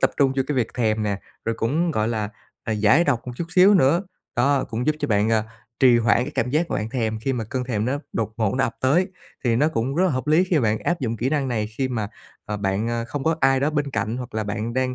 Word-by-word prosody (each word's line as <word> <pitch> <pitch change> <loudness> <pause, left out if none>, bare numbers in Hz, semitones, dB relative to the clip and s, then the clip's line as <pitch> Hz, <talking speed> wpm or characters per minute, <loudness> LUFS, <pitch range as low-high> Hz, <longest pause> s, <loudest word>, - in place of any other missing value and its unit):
tập - - +4
trung 135 -2 +3
cho 135 - +3
cái 150 - -2
việc 120 -3 -1
thèm 110 -3 +1
nè, 100 -2 -2 0.2
rồi 115 - 0
cũng, 155 +10 +1
gọi 110 -6 0
là, 110 -3 -2 0.3
à, 110 - -1
giải 110 +10 +4
độc 130 -6 0
một 125 - -4
chút 170 - -2
xíu 190 +3 +7
nữa. 170 +1 +4 0.3
Đó 135 +2 +2
cũng 120 +3 -4
giúp 155 - +3
cho 145 - -2
bạn, 105 0 +2
à, 110 -1 +2 0.4
trì 125 -3 +6
hoãn 115 0 +3
cái 140 - -4
cảm 125 - 0
giác 160 +5 0
mà - - 0
bạn 105 +2 -3
thèm 110 -3 -1
khi 135 - -1
mà 120 -3 -2
cơn 125 +3 -3
thèm 110 -4 -1
nó 135 +4 -1
đột 110 -1 -2
ngột 110 -4 0
nó 130 - +2
ập 115 - -4
tới 155 +8 +3 0.4
thì 115 -2 +2
nó 150 +5 +3
cũng 130 -2 -2
rất 180 +4 +2
là 185 - +3
hợp 130 0 -2
lý 155 +4 +4
khi 185 -2 +1
mà 145 - +2
bạn 110 0 +1
áp 175 - -1
dụng 115 -3 -2
kỹ 120 +3 -1
năng 140 -2 0
này 110 -3 -1
khi 135 -1 +1
mà, 110 -5 -2 0.4
à, 105 - -3
bạn, 100 +2 -1
a, 115 0 -1
không 135 +3 -5
có 160 0 +2
ai 135 0 +4
đó 145 +2 +1
bên 145 -2 -1
cạnh 115 -3 -2
hoặc 125 -2 -7
là 110 - -1
bạn 110 +3 -3
đang, 130 0 0
125 Hz, 290 wpm, -23 LUFS, 110-145 Hz, 0.4 s, xíu